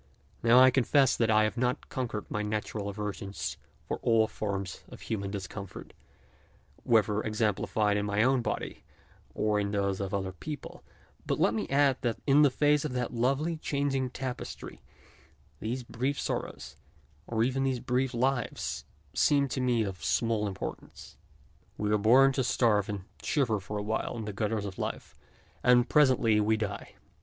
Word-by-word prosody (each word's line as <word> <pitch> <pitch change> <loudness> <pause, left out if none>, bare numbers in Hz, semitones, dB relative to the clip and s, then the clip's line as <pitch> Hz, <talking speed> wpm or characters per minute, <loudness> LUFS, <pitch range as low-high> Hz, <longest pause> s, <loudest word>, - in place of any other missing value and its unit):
Now 115 +1 +5
I 130 0 +8
con 130 0 +2
fess 135 0 +4
that 115 -2 +1
I 110 0 +5
have 110 +3 -1
not 125 +3 -1
conquered 115 -5 -3
my 105 - -3
natural 105 -1 -3
aversion 100 -1 -5 0.5
for - - -2
all 115 -1 +4
forms 100 -4 -4
of - - -12
human 100 -3 -3
discomfort, 100 0 -7 0.9
whether 110 -2 +3
exemplified 105 -1 0
in 105 0 -1
my 100 +1 +2
own 130 0 +3
body - - -4 0.5
or 105 -1 +1
in 100 -1 -1
those 100 -1 -1
of 100 -2 -3
other 95 -2 -2
people, 150 +10 -8 0.4
but - - 0
let - - +3
me 110 - -3
add 140 -1 +3
that 120 -3 -1
in 145 +1 +6
face 145 +2 +2
of 150 -4 -3
that 125 -1 -2
lovely 135 +8 0
changing 140 -3 -1
tapestry, 130 0 -6 0.8
these 120 +4 -3
brief 130 +4 -2
sorrows - - -4 0.5
and 115 0 +1
even 130 +1 -1
these 130 -2 0
brief 125 +2 0
lives 125 0 -1 0.3
seem 140 -1 +3
to 130 - -2
me 120 -3 +2
of 95 -3 -6
small 115 -3 +1
importance. 95 -1 -7 0.6
We 105 0 -1
are 105 - +3
born 130 +6 +6
to 130 0 0
starve 110 -4 +2
and 100 -2 -3 0.2
shiver 120 -8 +1
for 105 +2 -6
a 105 - -3
while 110 +2 -2
in 110 - -5
the 105 - -5
gutters 105 0 -1
of 95 -2 -7
life - - -4 0.5
and 125 0 +5
presently 125 -7 +4
we 110 +1 +2
die. 105 -2 -5
115 Hz, 165 wpm, -29 LUFS, 105-130 Hz, 0.9 s, I